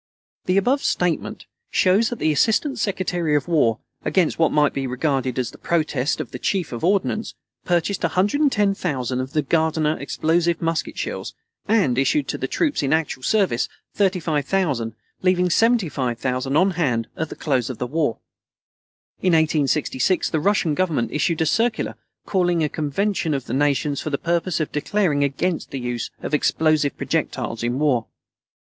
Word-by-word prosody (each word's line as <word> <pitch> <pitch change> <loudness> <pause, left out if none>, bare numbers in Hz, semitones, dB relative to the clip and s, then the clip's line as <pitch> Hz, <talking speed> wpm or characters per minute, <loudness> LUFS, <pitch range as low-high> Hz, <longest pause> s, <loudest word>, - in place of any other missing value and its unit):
The 185 +1 +2
above 255 +8 +2
statement 175 -3 -1 0.2
shows 200 +5 +3
that 240 - -4
the 155 - +1
Assistant 225 - +1
Secretary 180 -6 0
of 145 - 0
War, 140 -10 +2 0.3
against 180 -5 +1
what 160 - +3
might 150 -1 +3
be 135 -1 -2
regarded 130 -1 -1
as 125 -2 -1
the - - -15
protest 155 -4 0
of - - -5
the - - -6
Chief 185 -5 -1
of 120 - -6
Ordnance, 200 +4 0 0.3
purchased 175 +2 0
110,000 195 - +1
of 130 +1 -6
the 150 - +1
Gardiner 160 0 +1
explosive 170 +1 0
musket 165 -1 -2
shells, - - -4 0.3
and 185 - +2
issued 280 - +1
to - - -3
the - - -2
troops 300 -4 0
in 140 0 +1
actual 160 -4 -1
service 180 - +1 0.2
35,000, 160 - 0 0.3
leaving 180 -1 +2
75,000 135 - +1
on 190 +3 +4
hand 130 -10 0
at 160 -1 -3
the - - -7
close 130 -6 0
of 130 - -5
the - - -2
war. 145 -2 0 1.0
In 185 -2 +2
1866 155 0 +1
the 160 - +1
Russian 175 -2 +2
Government 145 -10 0
issued 160 +2 0
a - - +3
circular 225 +7 +1 0.3
calling 175 -4 +1
a 150 - +1
convention 160 +2 -1
of 135 - -4
the - - -5
Nations 145 +1 +1
for - - -3
the 140 - -1
purpose 170 +2 -1
of 155 - -2
declaring 150 -2 +1
against 155 +5 -1
the 135 - -5
use 120 -1 -3
of - - -4
explosive 155 -1 +2
projectiles 115 - -2
in 120 +2 -1
war. 135 -6 +1
160 Hz, 160 wpm, -22 LUFS, 135-185 Hz, 1.0 s, on